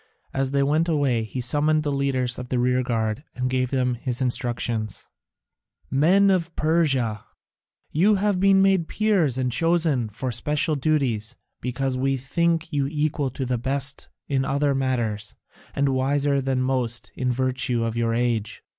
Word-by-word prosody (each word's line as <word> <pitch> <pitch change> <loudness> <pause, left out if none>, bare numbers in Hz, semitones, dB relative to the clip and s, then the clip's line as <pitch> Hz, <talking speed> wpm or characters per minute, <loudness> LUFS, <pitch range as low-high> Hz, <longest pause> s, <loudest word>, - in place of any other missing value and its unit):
As 135 0 0
they 140 0 +1
went 155 +4 +1
away 140 -7 +1
he 110 +4 -6
summoned 150 +5 +2
the 145 - -1
leaders 130 -3 -1
of 125 0 -7
the 125 - 0
rearguard 125 -1 0
and 125 0 -2
gave 130 -1 0
them 125 -2 0
his 120 0 -3
instructions: 120 -4 -1 0.9
"Men 185 +9 +4
of 175 -3 -1
Persia, 135 -10 +1 0.7
you 200 +7 +4
have 200 -1 +1
been 195 0 +5
made 190 -4 +3
Peers 195 - +1
and 130 -1 0
chosen 160 -6 +1
for 125 +5 -4
special 150 +6 0
duties, 130 -6 -1 0.2
because 130 +1 -2
we 135 +1 +1
think 165 +4 -1
you 140 -2 +1
equal 150 -1 -1
to 130 +1 -4
the 125 -1 -1
best 135 +2 -1 0.2
in 135 -2 0
other 140 +1 +1
matters, 120 -6 -1 0.4
and 140 0 +2
wiser 140 +1 +1
than 130 -1 0
most 120 -2 -1
in 125 -1 -1
virtue 130 -1 0
of 115 0 -2
your 115 -1 0
age. 115 -3 -1
135 Hz, 155 wpm, -24 LUFS, 125-150 Hz, 0.9 s, been